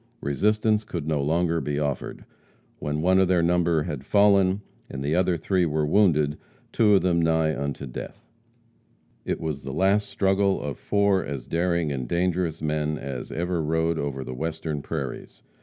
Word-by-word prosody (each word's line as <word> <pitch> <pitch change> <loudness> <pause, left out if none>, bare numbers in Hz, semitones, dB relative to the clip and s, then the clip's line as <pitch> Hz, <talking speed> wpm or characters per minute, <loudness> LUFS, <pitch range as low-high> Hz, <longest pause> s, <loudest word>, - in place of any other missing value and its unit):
Resistance 105 +8 +1
could 85 -7 -5
no 75 -3 0
longer 85 +3 +1
be 75 -1 -2
offered, 70 -3 -3 0.5
when 75 +1 -2
one 95 +1 +4
of 95 - +4
their 90 -2 +2
number 85 -2 +2
had 75 -6 -5
fallen, 100 +1 +3 0.3
and 70 0 -5
the 75 +3 0
other 90 -1 +2
three 90 +3 +1
were 75 -2 0
wounded, 75 -4 +2 0.3
two 105 -3 +4
of 95 - +3
them 85 -2 +2
nigh 80 -1 +2
unto 70 0 -4
death. 65 - -8 1.0
It - - -2
was 75 -4 -3
the 65 - -6
last 95 +7 +2
struggle 95 0 +1
of 70 -2 -5
four 100 -2 +2
as 70 -3 -5
daring 85 -1 0
and 65 -3 -3
dangerous 85 0 -1
men 75 0 -1
as 65 -4 -6
ever 85 0 -1
rode 80 +1 0
over 70 -2 -3
the 65 - -6
Western 80 +1 -3
prairies. 70 -4 -6
80 Hz, 170 wpm, -25 LUFS, 75-95 Hz, 1.0 s, one